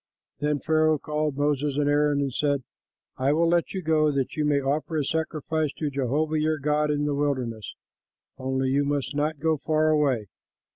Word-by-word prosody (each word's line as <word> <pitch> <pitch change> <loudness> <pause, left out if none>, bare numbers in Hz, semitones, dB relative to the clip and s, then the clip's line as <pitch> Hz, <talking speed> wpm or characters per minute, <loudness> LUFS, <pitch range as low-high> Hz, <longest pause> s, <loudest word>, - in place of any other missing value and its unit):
Then 150 0 +1
Pharaoh 155 +1 +2
called 150 -1 -2
for 145 - -3
Moses 145 -1 0
and 145 -1 +1
Aaron 145 0 +2
and 135 -2 -2
said, 145 -1 0 0.5
"I 135 +2 +2
will 165 +2 +2
let 170 0 +1
you 190 - -3
go 155 -1 +3
that 135 -2 -2
you 155 - 0
may 145 -1 +3
offer 150 +3 -1
a 145 - 0
sacrifice 155 -1 -1
to 150 -2 -3
Jehovah 145 +4 0
your 155 0 +1
God 150 +1 +1
in 145 0 0
the 145 - 0
wilderness; 130 -7 -2 0.6
only 130 0 -1
you 140 +2 +2
must 145 0 -2
not 150 +1 0
go 160 +2 +1
far 155 +2 +1
away. 140 -8 +2
150 Hz, 190 wpm, -26 LUFS, 140-155 Hz, 0.6 s, go